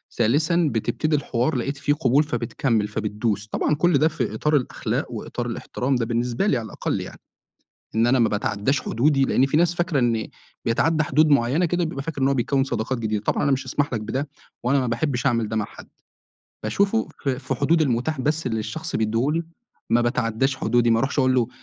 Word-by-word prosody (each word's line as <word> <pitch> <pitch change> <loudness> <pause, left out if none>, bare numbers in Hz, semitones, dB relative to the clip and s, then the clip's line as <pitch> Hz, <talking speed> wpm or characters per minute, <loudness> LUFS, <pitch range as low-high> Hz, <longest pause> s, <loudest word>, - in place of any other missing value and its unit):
ثالثا 155 +8 +2
بتبتدي 120 +7 0
الحوار، 140 0 0
لقيت 135 +3 -2
فيه 140 +1 +1
قبول 140 +1 +3
فبتكمّل، 115 -5 -1
فبتدوس، 105 0 -2
طبعًا 150 - 0
كل 170 +1 +3
ده 155 +3 +4
في - - -2
إطار 150 0 +1
الأخلاق 130 -4 -1
وإطار - - -5
الإحترام 130 +2 -2
ده 120 - 0
بالنسبة 120 - -1
لي 135 - +3
على 115 - -4
الأقل - - -3
يعني، - - -9 0.8
إن 115 +1 +3
أنا 130 +1 +3
ما 115 - +4
باتعدّاش 105 +5 0
حدودي 135 +4 +2
لأن 135 0 +3
في 145 - 0
ناس 175 +1 +3
فاكرة 175 -4 0
إن 115 -3 +1 0.4
بيتعدّى 155 +7 +2
حدود 155 +2 +3
معينة 140 +5 +3
كده 175 +1 0
بيبقى 145 -4 -4
فاكر 145 -2 -4
إن 135 - +4
هو 140 - +2
بيكوّن 135 +2 +1
صداقات 120 -1 -2
جديدة، 110 -2 -2
طبعًا - - 0
أنا 140 - +2
مش 135 - -1
هاسمَح 145 -2 -1
لك 115 - -1
بده 130 +7 -3 0.3
وأنا 135 +3 +2
ما 130 - -1
بحبّش 125 +2 -1
أعمل 115 -4 +1
ده 110 - -3
مع 105 - +1
حد، - - -12 0.7
باشوفه 200 +3 +1
في 135 -3 -1
في 135 0 -3
حدود 155 +5 +2
المُتاح 130 +2 0
بس 150 +2 -1
اللي 110 -2 -1
الشخص 110 0 -4
بيدّيه 115 +5 +1
لي 165 +2 0 0.5
ما 120 - +4
باتعدّاش 120 +2 0
حدودي، 120 -1 +2
ما 115 - +4
أروحش 135 +4 -1
أقول 130 -1 +3
له، 120 -2 +2
130 Hz, 205 wpm, -23 LUFS, 115-145 Hz, 0.8 s, ده